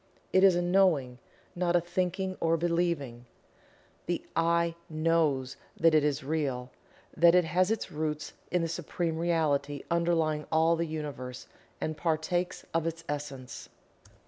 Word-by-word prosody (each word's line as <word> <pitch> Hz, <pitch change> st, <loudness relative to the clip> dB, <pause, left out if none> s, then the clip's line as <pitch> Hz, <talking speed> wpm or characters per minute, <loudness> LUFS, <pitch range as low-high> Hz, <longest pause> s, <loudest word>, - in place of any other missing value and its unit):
It 185 Hz, -, +5 dB
is 190 Hz, -2 st, +7 dB
a 175 Hz, -, +1 dB
Knowing, 175 Hz, -9 st, +2 dB, 0.4 s
not 175 Hz, -1 st, +1 dB
a -, -, +6 dB
Thinking 185 Hz, +2 st, -2 dB
or 165 Hz, 0 st, +2 dB
Believing. 165 Hz, -8 st, -1 dB, 0.8 s
The 175 Hz, -, -1 dB
"I" 170 Hz, 0 st, +2 dB, 0.2 s
knows 155 Hz, -5 st, +1 dB, 0.2 s
that 165 Hz, -1 st, +4 dB
it 155 Hz, -2 st, +5 dB
is 145 Hz, -1 st, 0 dB
Real 135 Hz, -4 st, -2 dB, 0.4 s
that 170 Hz, +1 st, +6 dB
it 180 Hz, -2 st, +5 dB
has 180 Hz, +4 st, +2 dB
its 225 Hz, -1 st, -2 dB
roots 150 Hz, 0 st, -3 dB, 0.2 s
in 180 Hz, -1 st, +1 dB
the -, -, 0 dB
Supreme 165 Hz, 0 st, -3 dB
Reality 145 Hz, -4 st, 0 dB
underlying 165 Hz, -3 st, +1 dB
all 160 Hz, +1 st, +4 dB
the 165 Hz, 0 st, -1 dB
Universe, 140 Hz, -5 st, -6 dB, 0.3 s
and 155 Hz, -, -2 dB
partakes 175 Hz, +3 st, -1 dB
of 165 Hz, 0 st, +1 dB
its 165 Hz, 0 st, -4 dB
Essence. 140 Hz, -3 st, -6 dB
165 Hz, 145 wpm, -29 LUFS, 150-175 Hz, 0.8 s, is